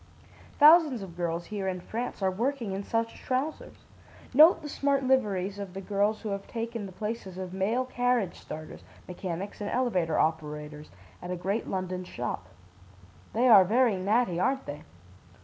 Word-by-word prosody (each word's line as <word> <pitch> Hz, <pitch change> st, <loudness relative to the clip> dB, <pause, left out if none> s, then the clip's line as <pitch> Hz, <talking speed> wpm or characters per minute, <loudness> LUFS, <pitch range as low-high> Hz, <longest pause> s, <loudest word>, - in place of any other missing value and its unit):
Thousands 300 Hz, -, +6 dB
of 175 Hz, -3 st, -10 dB
girls 170 Hz, -1 st, -2 dB
here 200 Hz, -1 st, -4 dB
in 185 Hz, -1 st, -2 dB
France 225 Hz, +2 st, -5 dB
are 190 Hz, -, +3 dB
working 235 Hz, +2 st, -2 dB
in 195 Hz, +1 st, -3 dB
such 230 Hz, +2 st, -2 dB
trousers. 265 Hz, +5 st, -3 dB, 0.5 s
Note 315 Hz, +4 st, +7 dB
the -, -, -5 dB
smart 280 Hz, -1 st, 0 dB
liveries 205 Hz, -7 st, +1 dB
of 195 Hz, -2 st, -7 dB
the -, -, -4 dB
girls 205 Hz, +2 st, 0 dB
who 215 Hz, -, -3 dB
have 200 Hz, 0 st, -4 dB
taken 230 Hz, -2 st, -4 dB
the -, -, -10 dB
places 210 Hz, -1 st, -5 dB
of 185 Hz, -1 st, -6 dB
male 215 Hz, +7 st, 0 dB
carriage 245 Hz, -6 st, 0 dB
starters, 155 Hz, 0 st, -9 dB, 0.2 s
mechanics 185 Hz, +2 st, -5 dB
and 205 Hz, -, -3 dB
elevator 185 Hz, -11 st, 0 dB
operators, 150 Hz, -1 st, -2 dB, 0.3 s
at 180 Hz, -, -7 dB
a 180 Hz, -, -1 dB
great 195 Hz, +5 st, -2 dB
London 185 Hz, -1 st, -3 dB
shop. 120 Hz, -, -5 dB, 0.9 s
They 240 Hz, +3 st, +3 dB
are 210 Hz, -6 st, +9 dB
very 230 Hz, +3 st, +3 dB
natty, 190 Hz, -1 st, +1 dB
aren't 265 Hz, +6 st, 0 dB
they? 145 Hz, +1 st, -7 dB
200 Hz, 165 wpm, -28 LUFS, 180-245 Hz, 0.9 s, are